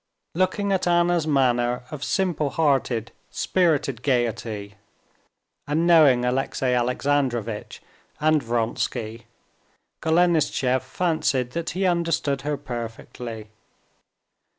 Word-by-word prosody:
Looking 185 +3 0
at 190 -2 +1
Anna's 175 -2 +2
manner 125 -4 +2
of 150 -2 -6
simple 175 -7 0
hearted, 135 -6 0 0.2
spirited 150 -9 0
gaiety, 115 -5 -1 0.9
and 155 +3 +1
knowing 150 -8 +5
Alexey 130 0 0
Alexandrovitch 125 -3 -1 0.4
and 155 0 +3
Vronsky, 115 -1 -2 0.7
Golenishtchev 160 -6 +2
fancied 145 -4 -1
that 170 +2 -3
he 190 - +1
understood 165 -6 0
her 145 +1 -2
perfectly. 115 -3 -7
135 Hz, 90 wpm, -24 LUFS, 120-165 Hz, 0.9 s, knowing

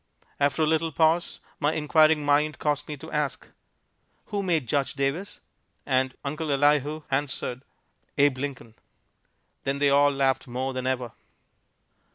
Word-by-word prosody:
After 145 +2 +2
a - - +4
little 160 +1 +1
pause 160 +3 +1 0.2
my 145 +2 +1
inquiring 155 0 +3
mind 150 +1 +2
caused 145 -1 -1
me 150 - -5
to 160 +3 -11
ask, 150 -3 -2 0.8
"Who 205 -1 -1
made 170 -7 0
Judge 140 +3 0
Davis?" 140 +8 -2 0.4
And 130 -1 +1
Uncle 150 +2 -3
Elihu 145 +2 +2
answered, 135 -2 -2 0.6
"Abe 140 -2 +3
Lincoln." 130 -5 -5 0.9
Then 135 +1 -1
they 140 0 +3
all 145 +1 +5
laughed 135 -1 0
more 130 +2 -3
than 130 0 -3
ever. 125 -3 -1
145 Hz, 140 wpm, -26 LUFS, 135-155 Hz, 0.9 s, all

